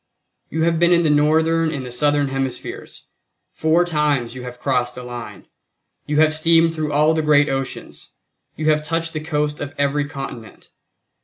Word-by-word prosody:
You 160 0 -1
have 165 -1 +1
been 170 0 +4
in 170 -1 +4
the 155 - +3
Northern 160 +2 +2
and 140 -5 -4
the 125 - -7
Southern 145 +2 +1
Hemispheres; 135 -2 -5 0.5
four 160 +2 +2
times 150 -8 0
you 130 - -8
have 125 0 -9
crossed 125 -2 -1
the 125 - -8
line; 120 -1 -8 0.6
you 150 0 -1
have 155 0 +4
steamed 165 +1 +3
through 155 -2 -3
all 150 +2 +3
the 160 - 0
great 150 -1 +4
oceans; 135 -1 -5 0.5
you 155 0 +1
have 150 0 +1
touched 165 +1 -2
the 155 - -2
coast 150 -1 -2
of 145 0 -6
every 140 +1 0
continent. 135 -5 -9
150 Hz, 175 wpm, -20 LUFS, 135-160 Hz, 0.6 s, been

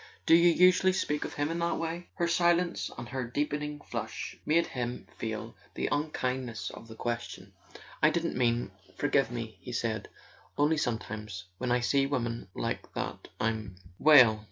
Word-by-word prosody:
Do - - +5
you 170 +1 +7
usually 185 +2 +5
speak 150 -5 -1
of - - -6
him 145 +2 0
in 170 - -2
that 170 0 0
way?" 165 +1 -4
Her 170 -2 +1
silence 175 0 +2
and 120 0 -6
her 130 +2 -2
deepening 150 +3 -2
flush 110 -4 -5
made 165 +2 +4
him 125 -1 -4
feel - - -4 0.2
the - - -1
unkindness 130 -5 -2
of 115 - -11
the 110 - -10
question. 120 +1 -4 0.5
"I - - +7
didn't 170 0 -1
mean... 120 -4 +1 0.2
forgive 140 -3 +2
me," 115 -5 -6
he 125 - -7
said. 115 -2 -2 0.5
"Only 150 +2 +3
sometimes, 110 -7 -3 0.2
when 125 -1 -1
I 125 0 +3
see 135 +2 +2
women 120 -7 -2
like - - -3
that - - -4
I'm 110 -3 -1
" 90 0 -24
"Well?" 120 -8 +8
130 Hz, 170 wpm, -30 LUFS, 115-160 Hz, 0.5 s, Well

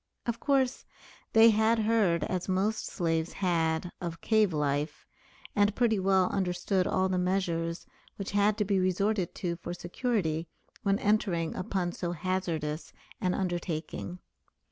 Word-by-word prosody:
Of 235 -1 -2
course 270 -3 +1 0.5
they 225 +1 +7
had 220 +2 +3
heard, 215 -6 +2
as 185 0 -2
most 200 +4 0
slaves 165 -2 -1
had, 170 -2 0
of 170 -2 -4
cave 215 -3 +3
life, 150 0 -1 0.5
and 205 0 +3
pretty 225 -4 +2
well 190 -1 +3
understood 185 0 0
all 185 - +2
the 185 -1 0
measures 175 -2 -1 0.3
which 200 - -5
had 205 +1 +3
to 210 - +1
be 195 -1 +2
resorted 185 +1 0
to 170 -2 -2
for 175 0 -6
security 175 -4 -1 0.3
when 200 -2 +2
entering 195 -6 +1
upon 185 -1 -1
so 175 0 -3
hazardous 165 -3 -2 0.3
an 180 -1 +1
undertaking. 175 -1 -3
185 Hz, 140 wpm, -29 LUFS, 170-205 Hz, 0.5 s, they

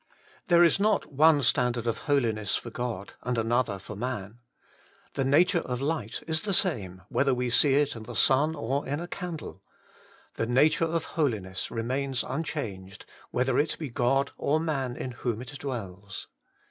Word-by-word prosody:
There 175 -1 +6
is 170 +2 +4
not 210 -7 +1
one 150 0 +5
standard 120 -1 +2
of 115 - -1
Holiness 110 -7 +2
for 120 - -4
God 115 -5 -4
and 125 -1 -2
another 115 -2 +1
for 100 +2 -9
man. 115 -1 -4 0.7
The 135 - 0
nature 170 +7 +4
of 125 -5 -4
light 140 -5 -2
is 160 0 0
the 200 -3 0
same, 95 - 0
whether 135 -2 +2
we 125 -1 -1
see 135 +2 +5
it 145 -1 +2
in 115 - -7
the 115 +2 -8
sun 145 +4 +4
or 140 +1 -1
in 145 +3 -1
a 175 - -5
candle: 175 -3 -6 0.8
the 115 - 0
nature 150 +7 +4
of 165 0 -1
Holiness 105 - -2
remains 130 +3 -1
unchanged, 110 -10 -5 0.2
whether 125 0 +1
it 150 - 0
be 150 -6 -5
God 135 +4 +1
or 155 +2 +2
man 135 -6 -2
in 130 - -5
whom 120 -2 -3
it 130 +3 -8
dwells. 100 -7 -6
130 Hz, 170 wpm, -28 LUFS, 115-150 Hz, 0.8 s, There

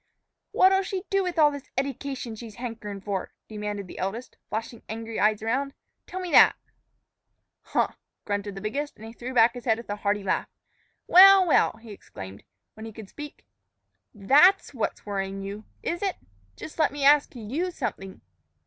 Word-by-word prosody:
"What'll 385 +1 +5
she 380 -1 -4
do 390 0 +3
with 360 -2 -3
all 300 -2 +6
this 285 -1 -9
eddication 270 -3 -3
she's 220 -1 -10
hankerin' 225 -5 -6
for?" 195 -2 -4
demanded 210 -2 -5
the 180 - -10
eldest, 220 +7 -4
flashing 225 +1 -5
angry 225 0 -5
eyes 215 0 +2
around. 270 +5 -1 0.3
"Tell 370 - -6
me 365 -2 -5
that." - - +7 1.1
"Huh!" - - 0 0.4
grunted 205 -1 -3
the 195 - -7
biggest, 280 +8 -3
and 220 - -12
he 225 - -9
threw 245 +2 -7
back 230 0 +6
his 245 -1 -9
head 225 -3 +2
with 230 -3 -8
a 205 - -3
hearty 205 0 -1
laugh. 190 - -1 0.6
"Well! 385 +1 +8
well!" 330 - +3
he 225 -1 -13
exclaimed, 95 - -10 0.3
when 220 +1 -9
he - - -8
could 215 -3 -10
speak; 295 0 -10 0.7
"that's 285 - +4
what's 235 - -3
worrying 195 -1 -3
you, 200 +2 -7 0.2
is 345 - -2
it! 390 -2 -1 0.4
Jus' 315 - -10
let 315 - +3
me 285 0 -5
ask 285 -1 +5
you 255 - -3
something. 195 - -5
230 Hz, 175 wpm, -26 LUFS, 210-290 Hz, 1.1 s, Well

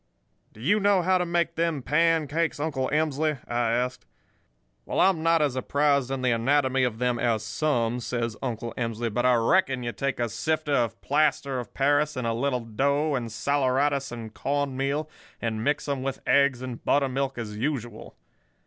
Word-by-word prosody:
"'Do - - -16
you 190 - +2
know 200 -2 +3
how 185 +1 +3
to 180 - -1
make 170 0 0
them 165 -5 -1
pancakes, 165 0 +1
Uncle 145 -4 -1
Emsley?' 155 0 +1
I 120 -1 0
asked. 125 +2 -2 0.8
"'Well, - - -3
I'm 185 -4 +4
not 165 -1 +3
as 140 -4 0
apprised 140 0 +1
in 135 -1 -3
the 125 - +3
anatomy 130 +2 +2
of 120 -3 0
them 125 0 0
as 115 -3 +1
some,' 125 -6 0
says 115 -2 -3
Uncle 120 -3 -4
Emsley, 115 -1 -3
'but 120 +3 +2
I 125 - +5
reckon 130 +2 +2
you 120 - -2
take 135 +1 -3
a 120 - +1
sifter 155 +6 -1
of 115 -4 0
plaster 140 -2 +1
of 120 - -8
Paris 145 +2 +2
and 125 -2 -3
a 115 - 0
little 125 +1 -1
dough 140 +7 0
and 120 -4 -2
saleratus 140 +3 0
and 115 -2 -7
corn 140 -1 -1
meal, 140 +3 -1 0.3
and 110 -1 -2
mix 145 +4 0
'em 140 -2 -1
with 135 0 -3
eggs 140 -3 +3
and 125 -2 -7
buttermilk 135 -1 0
as 105 -3 -5
usual. 120 -3 -4
135 Hz, 180 wpm, -26 LUFS, 120-150 Hz, 0.8 s, I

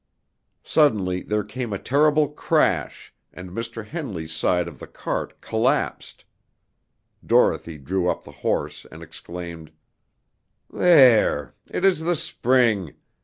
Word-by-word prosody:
Suddenly 100 - +2
there 105 0 -1
was 105 +1 -17 0.2
a 100 - -2
terrible 150 +5 +2
crash, 150 - 0 0.2
and 90 0 -10
Mr. 115 +1 -6
Henley's 105 - -5
side 85 +2 +1
of 85 - -10
the - - -9
cart - - -5
collapsed. 120 +6 -1 1.0
Dorothy 80 -2 +2
drew 90 +6 -1
up - - -2
the - - -13
horse - - -2
and - - -11
exclaimed: 85 -2 -9 1.0
"There! 125 - +5 0.2
It 190 - -1
is 190 -4 +4
the 170 +2 0
spring. 120 - +1
105 Hz, 120 wpm, -23 LUFS, 90-140 Hz, 1.0 s, There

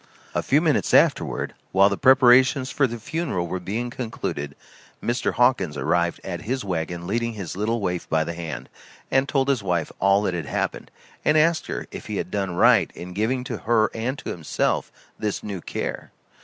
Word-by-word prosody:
A - - 0
few - - +3
minutes - - +2
afterward, - - +2 0.2
while 95 +1 +6
the 100 - 0
preparations 130 +1 +5
for 135 - +2
the 120 0 -5
funeral 135 - -2
were 90 +2 -3
being 110 +7 -3
concluded, 110 - -4 0.4
Mr. 120 +1 -1
Hawkins 120 - +2
arrived 85 0 +1
at 85 -3 -5
his 125 +3 -3
wagon 85 -1 -3
leading 115 +4 -1
his 100 -6 -6
little 110 +4 0
waif 90 -4 -3
by 80 0 +2
the 85 - -4
hand, 80 -7 -6 0.4
and 135 +1 +2
told 135 -2 +1
his 135 -5 +2
wife 90 -4 -1
all 100 +1 +4
that 95 - 0
had 85 -5 -4
happened, - - -2 0.3
and 150 - +3
asked 160 +1 +3
her - - -4
if - - -8
he - - -4
had - - -4
done 95 -3 -2
right - - +5
in 90 +1 -8
giving 115 +6 0
to 125 -3 -4
her 110 -1 +2
and 120 +5 -2
to - - -5
himself 80 -3 -1 0.3
this 105 -2 -2
new 100 -4 -5
care? - - -5
105 Hz, 190 wpm, -24 LUFS, 90-125 Hz, 0.4 s, while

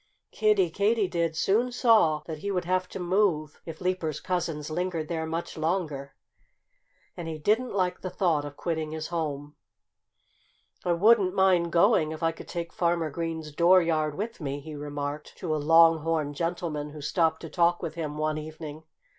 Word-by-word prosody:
Kiddie 425 -4 +2
Katydid 195 -6 +1
soon 230 +9 +2
saw 215 -11 +4
that 160 -2 -6
he 200 - -4
would 180 -3 -1
have 185 +1 0
to - - -7
move, 175 -5 0
if 160 -1 -7
Leaper's 180 -4 -1
cousins 165 -4 -3
lingered 170 -2 -2
there 160 -2 -2
much 165 +1 -4
longer. 155 -5 -2 1.0
And 170 - -6
he 160 -1 -4
didn't 215 +9 +1
like 180 -2 0
the 185 - -4
thought 170 -6 +1
of 145 0 -8
quitting 160 -2 -3
his 155 0 -5
home. 150 -3 -4 1.3
"I 175 - +2
wouldn't 195 +1 +4
mind 180 -3 +3
going, 170 -3 +3
if 160 - -7
I 165 - +3
could 165 - -12
take 170 -1 -5
Farmer 170 -3 0
Green's 160 -1 -4
dooryard 165 -2 +3
with 220 +1 -5
me," 140 -1 -3
he 155 +2 -9
remarked 145 0 -5
to 160 -4 -2
a - - 0
long 165 +2 +6
horned 155 -2 -1
gentleman 165 -2 -3
who 150 0 -9
stopped 160 +2 +1
to 165 - -7
talk 175 0 +2
with 160 - -3
him 155 -3 -4
one 155 0 -1
evening. 155 0 -8
165 Hz, 170 wpm, -27 LUFS, 155-180 Hz, 1.3 s, long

